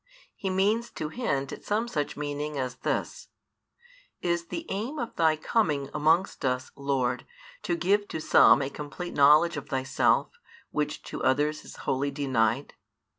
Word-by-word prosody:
he 195 - -3
means 210 +5 +1
to 155 - -5
hint 140 - -2
at - - -9
some 220 +3 0
such 150 -12 -3
meaning 145 0 -3
as 130 -1 -3
this: 485 - -3 0.9
Is 170 -1 -1
the 330 - -5
aim 225 +10 -3
of 240 -4 -4
Thy 160 -2 +3
coming 155 - 0
amongst 160 +5 +2
us, 130 -1 -1
Lord, 135 -3 -1 0.4
to 175 - -1
give 200 +4 +1
to - - -4
some 140 -2 +6
a 135 - -4
complete 150 +5 -6
knowledge 150 +4 +5
of 145 - -7
Thyself, 135 0 +1 0.4
which - - -2
to - - -6
others 150 +3 +1
is - - -11
wholly 135 +2 0
denied? 135 -3 0
150 Hz, 155 wpm, -27 LUFS, 140-190 Hz, 0.9 s, some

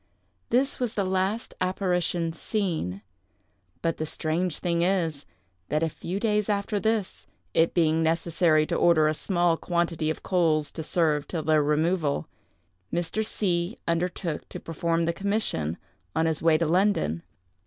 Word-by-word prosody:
This 260 +4 +2
was 245 -3 -2
the 200 - +1
last 190 +4 -1
apparition 180 -3 0
seen. 165 - -2 0.8
But 165 -1 0
the 155 - -3
strange 165 +2 -1
thing 170 -2 0
is, 170 - 0 0.4
that 155 +2 +1
a 165 - +1
few 180 +5 -5
days 210 -1 +1
after 205 0 0
this, 220 -2 -1 0.3
it 165 +1 +3
being 160 -2 +3
necessary 160 -1 +2
to - - -2
order 165 -3 +4
in 155 - +3
a - - -1
small 175 0 +1
quantity 170 -3 -1
of 155 - -4
coals 160 -5 +2
to 160 - -5
serve 155 -2 +1
till 165 -3 -3
their 155 -1 +3
removal, 150 - +1 0.6
Mr. 175 +5 -1
C—— 180 -2 -1
undertook 170 -1 -2
to - - -7
perform 165 +1 -1
the 170 - 0
commission 195 - -1 0.4
on 160 - +2
his 160 -2 0
way 160 -1 +4
to 165 - +1
London. 170 - +2
170 Hz, 155 wpm, -26 LUFS, 155-190 Hz, 0.8 s, order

